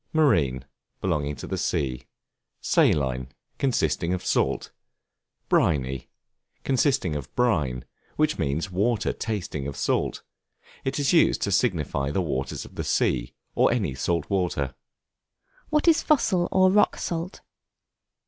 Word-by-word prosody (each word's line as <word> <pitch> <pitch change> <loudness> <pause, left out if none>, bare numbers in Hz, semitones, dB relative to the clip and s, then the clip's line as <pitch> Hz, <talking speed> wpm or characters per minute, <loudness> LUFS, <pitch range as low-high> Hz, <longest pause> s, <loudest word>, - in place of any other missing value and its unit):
Marine, 80 - +2 0.3
belonging 75 0 -1
to - - -8
the - - -3
sea. 65 -2 -2 0.5
Saline, 65 -3 +2 0.3
consisting 105 -9 +1
of 90 - -7
salt. - - 0 0.8
Briny, 65 -4 +1 0.5
consisting 130 - +1
of 70 -1 -6
brine; 75 - +1 0.3
which 155 0 +1
means 80 +7 -1
water 105 +4 +1
tasting 90 -10 -4
of 70 - -6
salt; - - -1 0.6
it 135 +1 -2
is 145 +1 +1
used 170 - +4
to 100 - 0
signify 80 - 0
the 75 - -1
waters 70 -7 -3
of - - -14
the - - -4
sea, - - 0 0.2
or - - +3
any - - 0
salt 80 +4 -1
water. 85 -9 -1 1.0
What 300 +2 +1
is 325 -1 +6
Fossil 190 - +2
or 185 0 +5
Rock 205 +2 +3
Salt? 170 +2 -4
90 Hz, 130 wpm, -25 LUFS, -, 1.0 s, is